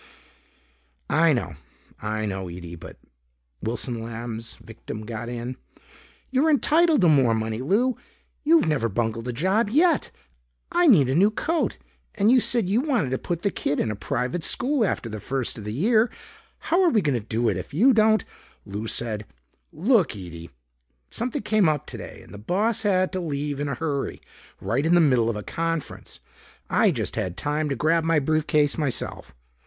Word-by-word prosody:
"I 165 +1 +4
know, 95 - -2 0.4
I 110 +1 -2
know, 95 -3 -4
Ede 85 -1 -8
but - - -11 0.3
" - - -47
Wilson 120 0 -3
Lamb's 115 0 -6
victim 110 0 -9
got 120 +1 -5
in. 120 +1 -5 0.7
"You're 270 +5 +3
entitled 310 0 +3
to 175 - +5
more 135 -7 +4
money, 110 0 -2
Lou! 220 - +1 0.5
You've 325 +2 +5
never 135 -7 +1
bungled 115 +2 -2
a - - -1
job 190 - +1
yet. 315 +5 +3 0.6
I 350 0 +3
need 165 - +6
a 130 - 0
new 190 +8 +5
coat. 320 +9 -1 0.4
And 210 +3 +3
you 255 - +6
said 235 -4 +3
you 210 +6 +2
wanted 250 - 0
to 130 - -1
put 170 -1 -4
the 200 - +1
kid 145 - -2
in 110 - 0
a - - -4
private 125 - -2
school 265 - +1
after 180 - -1
the 110 -1 -6
first 130 0 -3
of 105 - -9
the 105 - -4
year. 220 - +3 0.5
How're 355 +2 +2
we 220 - +2
gonna 140 -5 +1
do 115 +2 -1
it 100 - +1
if 90 - -6
you 235 - +4
don't 220 -1 +3 0.2
" - - -33
Lou 105 +2 -5
said, 110 -3 -3 0.4
"Look, 195 - +2
Ede! 85 -3 -9 0.6
Something 235 -1 -3
came 210 -5 +3
up 150 -2 -1
today - - -9
and - - -15
the 100 - -9
boss 210 - 0
had 185 -3 +2
to 185 - -2
leave 145 -4 -3
in 145 0 -2
a 140 - -2
hurry 145 -4 -3 0.4
right 130 +5 -1
in 165 +2 +3
the - - +6
middle 125 -8 +3
of 115 - -2
a 105 - -5
conference. 165 - -4 0.5
I - - +4
just - - -2
had 90 -1 -3
time 150 +1 -1
to 140 - -1
grab 165 +5 +2
my 165 -1 +2
briefcase 150 0 +1
myself. 140 -6 -3
145 Hz, 180 wpm, -24 LUFS, -, 0.7 s, need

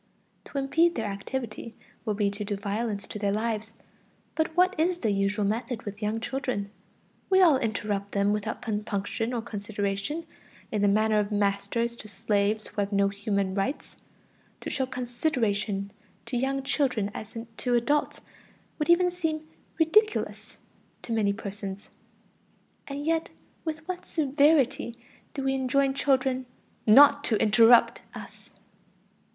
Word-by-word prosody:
To - - -7
impede 325 +5 +2
their 225 - -2
activity 225 +3 -5 0.3
would 210 -3 -1
be 205 -2 +1
to 205 +1 -5
do 205 0 -2
violence 205 +1 -3
to 210 - -7
their 200 -1 +1
lives. 220 +1 -2 0.6
But 320 +1 -1
what 370 +1 +5
is 345 +2 +2
the 225 -10 0
usual 200 +1 +1
method 230 +3 -2
with 205 -1 -7
young 215 +2 -1
children? 225 -5 -3 0.6
We 380 0 +5
all 325 -8 +6
interrupt 210 -3 -2
them 200 +1 +2
without 210 +2 -3
compunction 210 0 -2
or 235 -2 -2
consideration, 205 +7 -3 0.5
in 210 - 0
the 205 - +4
manner 215 +1 +3
of 205 0 -1
masters 210 +3 0
to 215 - -10
slaves 205 +1 0
who 210 - -3
have 200 +1 -2
no 200 0 +3
human 200 -1 -1
rights. 200 +9 -3 0.6
To - - -5
show 265 -2 -1
"consideration" 235 -6 -1 0.3
to 235 +2 -5
young 270 +2 0
children 250 -8 0
as 215 +1 -8 0.2
to 245 -1 0
adults 290 +5 +1 0.6
would 300 - -1
even 355 +1 +5
seem 315 -3 -3 0.3
ridiculous 425 +7 +1 0.5
to 230 - -3
many 210 -3 +2
persons. 200 -1 -6 1.0
And 285 +1 -5
yet 325 0 0 0.3
with 315 -1 -5
what 370 -1 -5
severity 280 -5 +2 0.4
do 275 - -3
we 270 0 +1
enjoin 270 +1 +1
children 260 -2 +1 0.4
"not 285 +5 +8
to 220 - +1
interrupt" 230 +2 +5
us! - - -11
230 Hz, 145 wpm, -27 LUFS, 205-275 Hz, 1.0 s, not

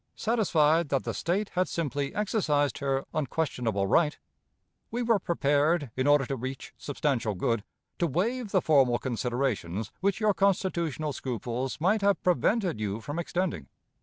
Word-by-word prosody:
Satisfied 170 -9 +2
that 135 -2 +1
the - - -3
State 195 +5 -1
had 180 0 0
simply 145 -4 -2
exercised 155 - +1
her 135 -1 0
unquestionable 125 -9 -1
right, 150 - +2 0.7
we 245 +1 -2
were 230 -3 +3
prepared, 145 - +1
in 130 +2 0
order 145 -2 +5
to 135 - -3
reach 130 +2 -6
substantial 130 -7 -1
good, 110 +3 0 0.4
to 170 - +2
waive 215 - -1
the 190 -3 +2
formal 135 -6 +4
considerations 120 -6 -2
which 200 +1 +1
your 215 -2 +3
constitutional 170 -7 0
scruples 125 +1 -3
might 195 +6 +2
have 200 0 +3
prevented 180 - +1
you 105 0 -2
from 145 +8 -5
extending. 175 - -2
150 Hz, 145 wpm, -28 LUFS, 130-185 Hz, 0.7 s, order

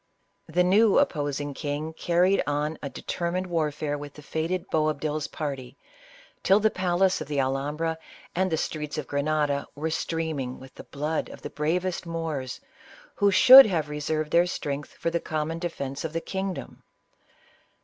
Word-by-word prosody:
The 175 +3 +2
new 200 +3 +4
opposing 145 - 0
king 150 +2 -4
carried 175 +4 +2
on 150 +2 -1
a 140 - -4
de - - -10
termined 180 +1 -2
warfare 150 -4 -1
with 145 -1 -8
the 150 - -12
fated 165 +5 -2
Boabdil's 155 -1 0
party, 135 -5 -5 0.6
till 195 +2 +5
the 215 0 +3
palace 185 -1 +1
of 155 - -5
the 145 -1 -1
Alhambra 145 +5 -1 0.3
and 185 +1 0
the 160 - +1
streets 150 -1 -3
of 155 - -3
Grenada 145 0 0
were 155 +3 -2
streaming 155 -6 -3
with 130 0 -13
the - - -11
blood 150 +3 -3
of - - -12
the - - -6
bravest 170 +4 -1
Moors, 160 -6 -4 0.5
who 205 -1 +3
should 260 +6 +10
have 160 -6 -1
reserved 150 +1 -2
their 170 +1 +4
strength 145 -4 -4
for 170 - -2
the 170 - 0
com 155 -1 -2
mon 165 +1 -4
defence 140 -6 -4
of 160 -1 -4
the 165 - 0
kingdom. 190 +2 -5
155 Hz, 165 wpm, -26 LUFS, 145-175 Hz, 0.6 s, should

